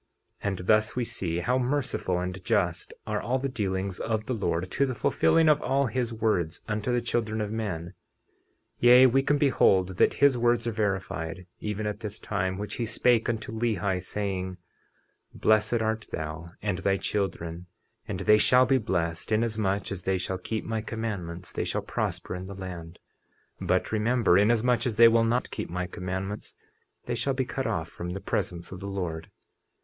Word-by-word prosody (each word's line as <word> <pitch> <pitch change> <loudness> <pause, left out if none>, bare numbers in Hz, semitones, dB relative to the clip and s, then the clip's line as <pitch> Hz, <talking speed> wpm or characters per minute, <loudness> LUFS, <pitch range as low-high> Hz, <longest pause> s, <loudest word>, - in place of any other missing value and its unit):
50:19 - - -1
And 95 - -3
thus 110 +1 +3
we 125 -1 0
see 95 -8 -3
how 125 +5 +1
merciful 125 -8 -1
and 90 +1 -4
just - - 0
are - - -2
all 130 +2 0
the 135 +1 -2
dealings 95 -6 -2
of 110 -1 -1
the 130 - -2
Lord, 95 -5 -1
to 140 - +2
the 130 - -3
fulfilling 165 +7 +3
of 150 -1 +5
all 135 +2 +2
his 120 0 -1
words 105 -8 -1
unto 110 +2 -1
the 120 0 +2
children 110 -2 -1
of 105 -1 -2
men; 95 -7 -3 0.9
yea, 125 +2 +8
we 130 +1 +4
can 145 +2 +2
behold 95 -10 +3
that - - +4
his 140 -3 +4
words 120 -1 +2
are 115 - 0
verified, 95 -5 -2
even 105 0 -3
at 105 -1 -3
this 105 -1 -6
time, 95 -3 -2
which 105 +1 -5
he 120 - -1
spake 120 +1 +2
unto 110 -2 -3
Lehi, 105 -5 0
saying: 95 -1 -3 0.8
50:20 - - -11
Blessed 110 +2 +3
art 110 0 -1
thou 80 +2 -5
and 100 -3 -1
thy 95 0 +1
children; 90 -4 -3 0.4
and - - -4
they 105 0 +5
shall 125 +4 +5
be 130 +1 +3
blessed, 85 -4 -2
inasmuch 110 -3 0
as 95 -2 -4
they 95 +1 0
shall 95 0 -3
keep 110 +4 -4
my 110 -1 -2
commandments 100 -6 -5
they - - -1
shall - - -2
prosper - - -3
in 90 +1 -6
the 100 - -7
land. 90 -3 -7 0.6
But - - 0
remember, 110 -2 +3
inasmuch 120 +4 +3
as 115 - -2
they 115 +2 +8
will 115 0 +4
not 120 +2 0
keep - - -4
my 90 +1 -2
commandments 95 +3 -5 0.5
they 120 - -2
shall 120 +4 -1
be 130 -1 0
cut 130 +1 -3
off 80 0 -1
from 85 - -6
the 95 +3 -4
presence 90 -4 -3
of 95 - -7
the 100 - -6
Lord. 85 -5 -4
105 Hz, 185 wpm, -27 LUFS, 95-120 Hz, 0.9 s, yea